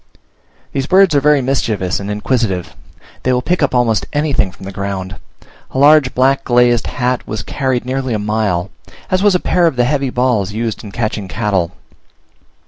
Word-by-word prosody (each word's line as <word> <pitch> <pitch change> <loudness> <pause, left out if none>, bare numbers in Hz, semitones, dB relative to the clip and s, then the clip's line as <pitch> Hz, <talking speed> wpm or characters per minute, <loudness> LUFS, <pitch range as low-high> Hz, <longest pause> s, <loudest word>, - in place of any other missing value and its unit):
These 135 0 -2
birds 190 -2 +5
are 145 - +4
very 145 -1 +3
mischievous 105 -10 -1
and 100 0 -6
inquisitive; 105 -4 -1 0.5
they 130 - 0
will 125 0 +1
pick 180 +3 0
up 140 -3 +1
almost 115 -3 +1
anything 145 -10 0
from 95 - -13
the 95 - -6
ground; 95 -1 -5 0.5
a - - -6
large 145 -1 +5
black 135 +2 +2
glazed 120 -1 +3
hat 125 0 -2
was 110 +1 -4
carried 130 -3 -2
nearly 130 -2 -2
a - - 0
mile, 105 -3 -1 0.4
as 185 0 +2
was 205 -2 +4
a - - +3
pair 175 -1 +2
of 160 - -1
the 120 0 +2
heavy 140 0 0
balls 120 -6 0
used 115 0 -3
in 105 - -9
catching 110 -3 -3
cattle. 95 -4 -1
120 Hz, 180 wpm, -16 LUFS, 105-135 Hz, 0.5 s, birds